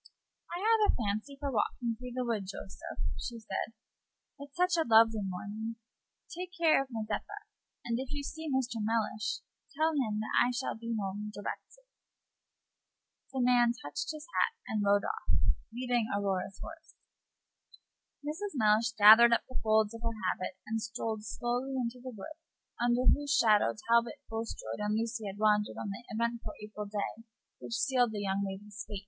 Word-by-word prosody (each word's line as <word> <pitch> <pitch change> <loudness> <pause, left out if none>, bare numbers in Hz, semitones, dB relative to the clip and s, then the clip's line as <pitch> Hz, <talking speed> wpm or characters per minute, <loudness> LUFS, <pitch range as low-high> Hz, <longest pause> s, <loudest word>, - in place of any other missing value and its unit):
"I 345 - -4
have 445 -2 +5
a - - -3
fancy 220 +5 -2
for 280 -1 -2
walking 235 +1 0
through 250 +1 -8
the 250 - 0
wood, 215 -5 -1
Joseph," 195 0 -6 0.2
she 235 - -4
said, 225 0 -4 0.7
"it's 285 0 -10
such 360 0 +3
a 330 - +3
lovely 225 -1 +6
morning. 205 +4 -4 0.6
Take 360 +1 -6
care 325 -4 +5
of 270 - -5
Mazeppa; 230 - -4 0.4
and 235 0 0
if 265 -1 -4
you 290 -1 -3
see 320 +2 -5
Mr. 255 -4 0
Mellish, 215 -1 -1 0.4
tell 320 +1 +3
him 220 -8 0
that 215 - -4
I 245 - +2
shall 250 +1 -2
be 230 +1 -4
home 205 +1 -3
directly." - - -7 1.5
The 265 -1 -1
man 240 -1 +5
touched 145 - -4
his 310 -1 -8
hat, 460 - +2
and 215 -1 0
rode 200 0 +4
off, 440 +1 -4 0.4
leading 245 -1 0
Aurora's 195 -1 -1
horse. 320 0 -10 1.3
Mrs. 325 +4 -4
Mellish 220 0 +4
gathered 225 +2 +9
up 235 - +3
the 255 - -4
folds 220 0 +3
of 230 - -8
her 230 -1 -2
habit 185 0 -5
and 225 0 -2
strolled 220 -1 -3
slowly 245 +4 -2
into 250 -1 -2
the 255 - -6
wood 305 +9 -9 0.4
under 240 +1 +2
whose 290 +2 +4
shadow 215 -4 +4
Talbot 235 0 +3
Bulstrode 225 - -4
and 210 +1 0
Lucy 225 -1 -2
had 195 0 -6
wandered 210 -1 +2
on 205 - -4
that 200 +4 -8
eventful 235 +1 -2
April 210 0 -6
day 210 +2 -4 0.4
which - - -7
sealed 250 -4 +2
the 205 - -3
young 195 0 0
lady's 205 +2 -6
fate. 205 - -4
230 Hz, 165 wpm, -32 LUFS, 210-255 Hz, 1.5 s, gathered